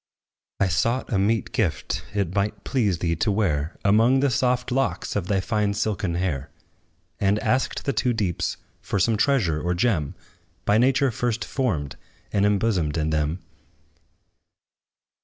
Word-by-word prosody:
I 100 - +3
sought 115 +7 0
a 100 - +2
meet 110 +3 +1
gift, 105 - -1
it 100 -4 0
might 100 +1 -1
please 105 -10 +1
thee 85 0 0
to 105 +6 +1
wear 85 -7 0
Among 115 +6 +4
the 140 -1 +2
soft 125 -1 +1
locks 135 +1 -1
of 100 -4 -1
thy 100 -1 +1
fine 100 +1 0
silken 100 -4 -1
hair; 75 -6 -2 0.7
And 100 +1 +2
asked 125 +4 0
the 140 - 0
two 125 - +1
deeps 100 -7 -1 0.2
for - - -2
some 110 +4 +2
treasure 105 - +1
or 90 +2 0
gem, 85 - 0 0.5
By 105 +1 +4
nature 135 +1 +3
first 120 0 -2
formed 85 - -2 0.4
and 100 0 +3
imbosomed 100 -7 +1
in 80 0 0
them. 80 +3 -1
100 Hz, 150 wpm, -24 LUFS, 90-115 Hz, 0.7 s, Among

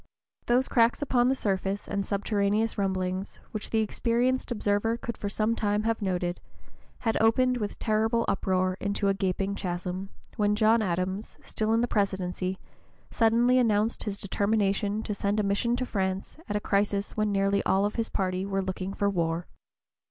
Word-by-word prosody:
Those 250 +2 +3
cracks 235 +3 +3
upon 250 -3 +3
the 265 - +2
surface 195 -3 -1
and 200 - -1
subterraneous 205 +2 0
rumblings, 190 -1 -2
which 215 -1 -4
the 225 - +2
experienced 240 +4 0
observer 210 +1 +1
could 235 0 -5
for 205 - -4
some 215 +2 +1
time 210 -1 0
have 225 0 0
noted, 180 -2 -1 0.6
had 225 -2 0
opened 250 +3 +3
with 210 -3 -4
terrible 225 +1 +1
uproar 185 -1 +1
into 200 0 0
a - - +3
gaping 195 +1 -1
chasm, 185 0 -4 0.3
when 210 0 +2
John 220 +1 +4
Adams, 190 +2 -2
still 215 0 -1
in 225 +1 +3
the 240 - +1
Presidency, 190 -3 -1 0.5
suddenly 240 +3 +4
announced 220 -1 +1
his 200 -2 -3
determination 200 +1 0
to 210 - -3
send 200 +1 0
a - - +2
mission 200 +4 +1
to 255 +1 -2
France 190 -4 -2
at 205 - -1
a - - +2
crisis 200 0 0
when 215 -1 +1
nearly 195 0 +2
all 195 +2 +2
his 230 0 -2
party 185 -1 -1
were 195 0 -1
looking 190 +1 -4
for 200 - +1
war. 170 -3 0
205 Hz, 165 wpm, -28 LUFS, 195-225 Hz, 0.6 s, John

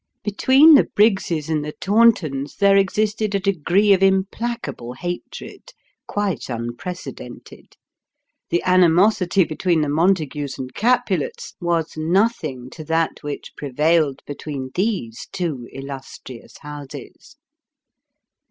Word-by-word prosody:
Between 265 +9 +5
the 285 - +6
Briggses 190 -7 +2
and 155 -2 -1
the 150 0 -6
Tauntons 190 -10 +2
there 200 0 +4
existed 210 +2 +1
a - - +2
degree 195 +2 +2
of 190 - +1
implacable 190 - -1
hatred, 175 - -7 0.3
quite 200 - -2
unprecedented. 120 +2 -8 0.7
The 175 - 0
animosity 185 +1 +4
between 165 +1 0
the 150 - -1
Montagues 150 -3 0
and 130 -1 -7
Capulets, 235 - 0
was 170 -2 -1
nothing 160 - 0
to 155 - -9
that 160 +1 -1
which 145 -1 -7
prevailed 150 +1 +1
between 140 -2 -6
these 180 - -2
two 150 -10 -4
illustrious 135 -2 -10
houses. 145 -2 -10
170 Hz, 105 wpm, -21 LUFS, 145-200 Hz, 0.7 s, the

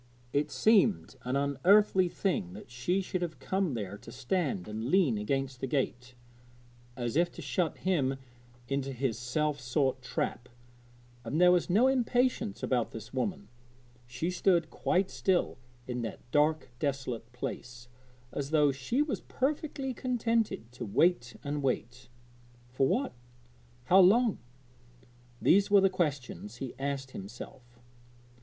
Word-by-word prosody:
It 145 +1 +1
seemed 215 +1 +3
an 125 +2 -2
unearthly 180 +7 +4
thing 160 - -1
that 105 +4 -11
she 175 +11 0
should 185 -1 -3
have 170 -3 -3
come 190 -7 -1
there 100 -2 -5
to - - -12
stand 135 - -1
and 110 +1 -4
lean 175 - +4
against 135 +4 -2
the 135 - -1
gate, 125 -2 -2 0.8
as 120 0 -2
if 175 +2 +3
to - - -8
shut 175 -3 -1
him 140 -8 0 0.5
into 135 0 -2
his 125 -2 -2
self 145 +4 -1
sought 130 +1 0
trap; 125 -1 -3 0.7
and 130 +7 -2
there 180 0 +7
was 180 0 +2
no 210 +8 +4
impatience 250 -4 +1
about 125 -3 +1
this 110 +1 -9
woman 130 - -2 0.6
she 125 +9 -2
stood 175 -3 +2
quite 185 +1 0
still 185 -8 0 0.3
in 125 -1 -3
that 115 -3 -5
dark, 150 -1 +2
desolate 130 -5 -3
place, 120 0 -6 0.4
as 140 -1 -3
though 150 -2 +4
she 140 - 0
was 300 - -3
perfectly 275 -1 -2
contented 230 - -1
to 125 0 -7
wait 125 - +2
and 145 0 -2
wait 125 -2 -2 0.6
for 130 +1 +2
what? 250 - 0 0.7
how 180 +10 +5
long? 215 +4 +5 1.0
these 200 +3 +4
were 205 0 +7
the 195 0 +4
questions 145 - -2
he 125 0 -6
asked 135 -1 -3
himself. 120 +4 -10
140 Hz, 140 wpm, -30 LUFS, 125-185 Hz, 1.0 s, there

